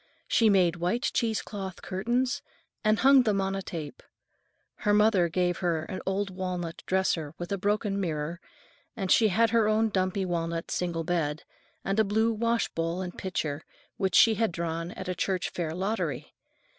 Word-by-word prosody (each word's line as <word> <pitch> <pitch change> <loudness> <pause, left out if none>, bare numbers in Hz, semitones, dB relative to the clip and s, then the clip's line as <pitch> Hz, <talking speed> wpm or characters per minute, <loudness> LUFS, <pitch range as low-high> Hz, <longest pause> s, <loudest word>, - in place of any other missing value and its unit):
She 225 -2 +4
made 180 -4 +3
white 180 +9 -1
cheesecloth 205 -4 -2
curtains 245 +8 -1 0.4
and 215 0 +3
hung 270 +1 +6
them 210 -5 +1
on 195 0 0
a 195 - -2
tape. 160 -6 -7 0.8
Her 205 -2 +2
mother 210 -5 +4
gave 175 0 0
her 170 -4 0
an 185 +3 -6
old 195 +1 -1
walnut 180 -2 -4
dresser 165 -5 0
with 175 +1 -6
a 200 - 0
broken 205 0 0
mirror, 165 0 -3 0.6
and 190 -3 -2
she 225 - +6
had 220 +3 +3
her 230 -2 +3
own 220 +1 +2
dumpy 185 -1 0
walnut 165 -1 -2
single 170 -2 -1
bed, 160 -3 -1 0.4
and 195 +2 0
a - - +6
blue 220 +3 +1
washbowl 210 -7 -1
and 180 -1 -6
pitcher 155 -6 -3 0.4
which 190 -3 0
she 225 - +7
had 225 -2 0
drawn 165 0 -3
at 190 - -7
a 185 - -1
church 185 +1 -1
fair 170 -3 -3
lottery. 200 +5 -2
190 Hz, 170 wpm, -28 LUFS, 170-215 Hz, 0.8 s, she